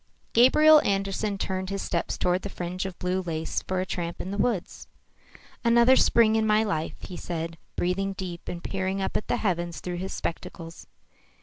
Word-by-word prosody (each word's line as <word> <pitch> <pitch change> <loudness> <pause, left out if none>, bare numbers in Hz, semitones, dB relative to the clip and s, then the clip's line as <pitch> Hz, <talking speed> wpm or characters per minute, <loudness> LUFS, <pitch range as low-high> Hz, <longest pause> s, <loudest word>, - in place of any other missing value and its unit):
Gabriel 305 +6 +7
Andersen 195 +1 -1
turned 190 -1 -3
his 195 0 -3
steps 170 - -2
toward 180 +1 +1
the 200 - -5
fringe 180 +1 -4
of 185 - -9
blue 180 +1 -1
lace 165 -3 -3
for 185 0 -2
a 185 - -1
tramp 170 -2 -4
in 190 - -4
the 200 - -3
woods. 205 -5 -1 0.8
"Another 235 +2 +6
spring 225 -3 +4
in 220 0 +2
my 215 +1 +4
life," 160 -7 -2
he 180 - -8
said, 165 -1 -4 0.2
breathing 195 +2 0
deep 180 -3 -7
and 175 -1 -6
peering 190 0 -2
up 190 - -2
at - - -1
the - - +1
heavens 175 -4 -1
through 180 -1 -4
his 190 +2 -4
spectacles. 165 0 -6
190 Hz, 185 wpm, -26 LUFS, 175-205 Hz, 0.8 s, Gabriel